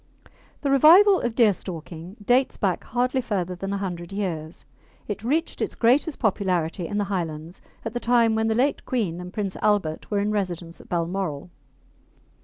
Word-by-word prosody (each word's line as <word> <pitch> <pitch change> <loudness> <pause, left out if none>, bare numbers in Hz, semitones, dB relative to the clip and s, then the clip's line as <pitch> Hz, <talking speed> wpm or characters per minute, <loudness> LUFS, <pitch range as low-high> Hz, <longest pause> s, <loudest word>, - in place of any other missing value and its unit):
The 280 - 0
revival 360 +8 +7
of 235 -2 -2
deerstalking 180 -5 -1
dates 255 +3 +2
back 190 -4 -1
hardly 250 +2 0
further 190 -7 -2
than 195 +2 -5
a 200 - -1
hundred 175 -3 -5
years. 175 -5 -4 0.4
It 210 0 -5
reached 310 +8 -1
its - - -2
greatest 265 +6 +2
popularity 185 -5 0
in 205 - -3
the 205 - +1
Highlands 170 -3 -4 0.2
at 225 - -4
the 240 - -2
time 235 -2 +3
when 220 0 +1
the 220 - +1
late 265 +5 +1
Queen 195 -10 -2
and 180 0 -8
Prince 200 -2 -3
Albert 195 -7 0
were 205 - 0
in 205 +1 0
residence 175 -5 -3
at - - -19
Balmoral. 175 -2 -2
200 Hz, 170 wpm, -24 LUFS, 175-235 Hz, 0.4 s, revival